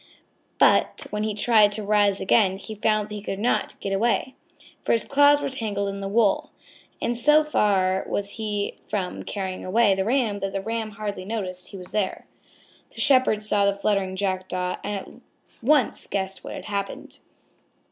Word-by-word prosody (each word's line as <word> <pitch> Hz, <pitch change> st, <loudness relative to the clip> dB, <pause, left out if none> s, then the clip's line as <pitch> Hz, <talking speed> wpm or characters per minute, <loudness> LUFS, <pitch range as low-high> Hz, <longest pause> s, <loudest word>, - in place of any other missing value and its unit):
But -, -, +3 dB
when 210 Hz, -, -2 dB
he 215 Hz, -1 st, -1 dB
tried 215 Hz, -1 st, +4 dB
to 215 Hz, -, -4 dB
rise 205 Hz, -1 st, +2 dB
again 195 Hz, -1 st, +3 dB
he 210 Hz, +2 st, -8 dB
found 215 Hz, 0 st, 0 dB
that -, -, -7 dB
he 210 Hz, -, -5 dB
could 195 Hz, -1 st, -4 dB
not 230 Hz, +5 st, -1 dB
get 195 Hz, -, -3 dB
away, 235 Hz, +5 st, +1 dB, 0.5 s
for -, -, +1 dB
his 230 Hz, -, +1 dB
claws 285 Hz, +1 st, +4 dB
were -, -, -1 dB
tangled 205 Hz, -6 st, -2 dB
in 200 Hz, 0 st, -5 dB
the 195 Hz, -, -3 dB
wool. 205 Hz, 0 st, +2 dB, 0.5 s
And 240 Hz, -, -1 dB
so 300 Hz, +6 st, +5 dB
far 190 Hz, -9 st, +1 dB
was 200 Hz, 0 st, -1 dB
he 210 Hz, -2 st, -3 dB
from 190 Hz, -4 st, -3 dB
carrying 190 Hz, -2 st, -4 dB
away 205 Hz, +2 st, +3 dB
the 190 Hz, 0 st, 0 dB
Ram, 225 Hz, -2 st, 0 dB
that 195 Hz, 0 st, -3 dB
the 195 Hz, -, -2 dB
Ram 225 Hz, +1 st, -3 dB
hardly 205 Hz, -2 st, -5 dB
noticed 185 Hz, -3 st, -4 dB
he 195 Hz, -, -9 dB
was 180 Hz, -1 st, -10 dB
there. 200 Hz, -3 st, -2 dB, 0.7 s
The -, -, -9 dB
Shepherd 255 Hz, -6 st, +3 dB
saw 205 Hz, -1 st, +2 dB
the 200 Hz, -, +1 dB
fluttering 200 Hz, -2 st, 0 dB
Jackdaw 185 Hz, -2 st, -2 dB
and 205 Hz, 0 st, -3 dB
at 195 Hz, -, -6 dB, 0.5 s
once 270 Hz, +1 st, +2 dB
guessed 190 Hz, -1 st, -3 dB
what -, -, -7 dB
had -, -, -8 dB
happened. 200 Hz, -1 st, -5 dB
205 Hz, 180 wpm, -24 LUFS, 195-225 Hz, 0.7 s, so